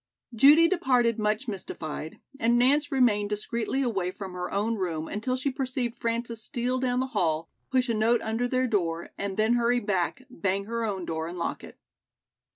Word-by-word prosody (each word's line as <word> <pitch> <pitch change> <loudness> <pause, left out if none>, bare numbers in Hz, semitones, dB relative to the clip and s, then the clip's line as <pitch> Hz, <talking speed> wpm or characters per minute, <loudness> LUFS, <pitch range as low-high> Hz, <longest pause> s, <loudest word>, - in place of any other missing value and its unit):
Judy 290 +8 +7
departed 250 - +2
much 215 +4 0
mystified 160 -6 -6 0.2
and 235 +1 +3
Nance 285 +4 +3
remained 220 -6 +3
discreetly 235 +5 -1
away 195 -8 -1
from 190 0 -7
her 180 0 -4
own 210 +3 0
room 170 -6 -2
until 225 +5 -2
she 275 +2 -1
perceived 255 -3 -2
Frances 230 -1 -2
steal 250 +3 -1
down 250 -1 +1
the - - 0
hall, 165 -5 0 0.2
push 255 -1 +2
a 230 - 0
note 225 +2 +3
under 225 +3 -1
their 255 +1 +1
door 170 -8 -1
and 200 -1 -4
then 220 +2 +3
hurry 240 0 +2
back, 195 -6 -1
bang 195 +3 -2
her 230 +2 -3
own 195 -4 -3
door 160 -1 -3
and 175 +1 -7
lock 170 - -3
it. - - -12
225 Hz, 180 wpm, -27 LUFS, 195-250 Hz, 0.2 s, Judy